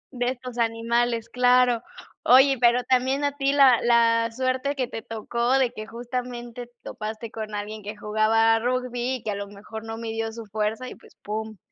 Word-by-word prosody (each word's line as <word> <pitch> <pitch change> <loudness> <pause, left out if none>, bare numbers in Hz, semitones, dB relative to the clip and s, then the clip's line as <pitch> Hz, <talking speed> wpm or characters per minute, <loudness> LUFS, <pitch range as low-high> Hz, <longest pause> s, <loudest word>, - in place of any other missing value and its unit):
De 245 0 -1
estos 250 -1 -5
animales, 230 0 0
claro. 250 -1 +3 0.4
Oye, 265 +2 +6
pero 240 +1 +4
también 260 +3 +1
a 285 0 0
ti 275 -1 +1
la 275 -4 +6
la 230 -1 +3
suerte 260 +3 -1
que 255 -3 -1
te 225 - -6
tocó 235 +3 -2
de 260 -3 +2
que 215 -1 -7
justamente 240 0 -6
topaste 220 +1 -6
con 215 -1 -6
alguien 210 +1 -5
que 210 +1 -7
jugaba 225 +2 +3
rugby 250 +1 -1
y 250 - -8
que 215 - -2
a - - -3
lo 200 0 -5
mejor 210 +2 -9
no 225 0 -6
midió 225 -1 -3
su 230 0 -8
fuerza 215 +4 -2
y, - - -7
pues, - - -20
pum. 215 +1 -5
235 Hz, 185 wpm, -25 LUFS, 220-250 Hz, 0.4 s, Oye